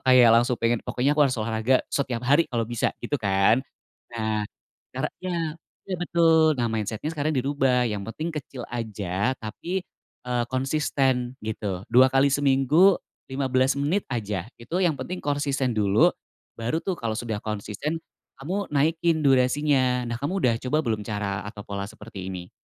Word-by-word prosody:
kayak 125 -2 +8
langsung 120 +1 +3
pengen 115 0 +1
pokoknya 135 +4 0
aku 150 - 0
harus 125 - -2
olahraga 110 +3 +1 0.2
setiap 130 -4 -1
hari 145 +6 +4
kalau 115 -2 0
bisa 120 0 0 0.2
gitu - - -2
kan? 100 +4 +3 0.5
Nah 110 -2 -1 0.5
caranya 185 0 -4 0.6
iya 190 - -2
betul 165 -2 +4 0.2
nah 120 - +1
mindset-nya 110 +5 -2
sekarang 155 0 -1
dirubah 130 -2 +2
yang 105 -3 -3
penting 155 +8 -4
kecil 135 -4 -6
aja 105 0 -2
tapi, 175 - -4 0.4
eee, 125 -1 0
konsisten 130 -2 0
gitu 100 -4 -3
2x 135 +2 +5
seminggu, 145 +7 +4 0.3
15 130 0 +1
menit 155 +8 +1
aja 105 -5 -3
itu 120 +8 -9
yang 170 -6 +2
penting 180 +8 -5
konsisten 140 -4 0
dulu, 105 0 +4 0.5
baru 120 +9 -1
tuh 190 -3 -2
kalau 115 -2 -2
sudah 115 -3 -3
konsisten, 110 +9 -3 0.4
kamu 185 +8 -3
naikin 160 +3 +2
durasinya 130 -1 +3
nah 120 - -2
kamu 145 +6 -2
udah 120 -2 +4
coba 130 +4 +1
belum 110 -2 0
cara 105 -2 -3
atau 105 -1 -8
pola 100 0 -3
seperti 105 -3 -9
ini? 90 -1 -7
125 Hz, 150 wpm, -25 LUFS, 110-145 Hz, 0.6 s, kayak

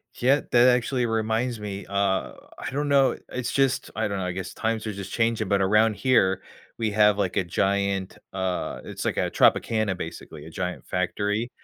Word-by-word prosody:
Yeah, 135 +4 +3
that 120 +1 +6
actually 125 0 +2
reminds 115 +1 -1
me, 100 -1 -6
uh, 100 -1 0 0.3
I - - -5
don't 145 +1 -1
know, 140 -2 +4
it's 125 -1 -3
just 135 -1 +1
I 110 -1 -1
don't 100 -1 -3
know, 90 - -2
I 90 - -2
guess 95 0 -5
times 110 0 -2
are 110 - -2
just 95 0 -7
changing, 115 -3 0
but 100 -1 +2
around 105 +3 +4
here, 95 -8 +2 0.4
we 110 -2 0
have, 105 -1 +4
like, 95 -2 -1
a 95 - +2
giant, 95 +2 -1
uh 95 -1 -2
it's - - -6
like - - -1
a - - 0
Tropicana, 110 -4 +2
basically, 80 -3 -8
a - - -10
giant 90 +2 -4
factory, 105 +5 -1
105 Hz, 190 wpm, -25 LUFS, 95-115 Hz, 0.4 s, that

